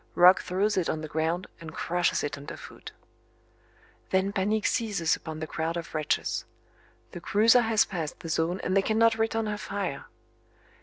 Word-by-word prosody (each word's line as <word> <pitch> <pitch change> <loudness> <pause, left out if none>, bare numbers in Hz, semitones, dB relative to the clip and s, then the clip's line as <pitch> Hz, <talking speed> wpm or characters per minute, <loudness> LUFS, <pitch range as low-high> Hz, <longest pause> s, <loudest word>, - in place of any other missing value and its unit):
Roch 180 +2 +7
throws 200 +3 0
it 180 - +1
on 155 - -2
the 155 - -5
ground 160 +4 -1
and 165 -2 -9
crushes 175 0 0
it 145 - -2
under 140 0 -8
foot. - - -11 1.2
Then 190 +1 +1
panic 210 +2 0
seizes 200 -8 +1
upon 160 -1 -7
the - - -2
crowd 160 +2 -3
of 170 - -7
wretches. 155 -2 -1 0.7
The 175 - -8
cruiser 225 +6 +5
has 220 -1 +3
passed 165 -5 -5
the 165 - -7
zone 165 +3 0
and 185 - 0
they 195 - +5
cannot 225 +2 +3
return 225 0 0
her 210 -1 -3
fire. 195 -10 -4
185 Hz, 170 wpm, -27 LUFS, 160-210 Hz, 1.2 s, Roch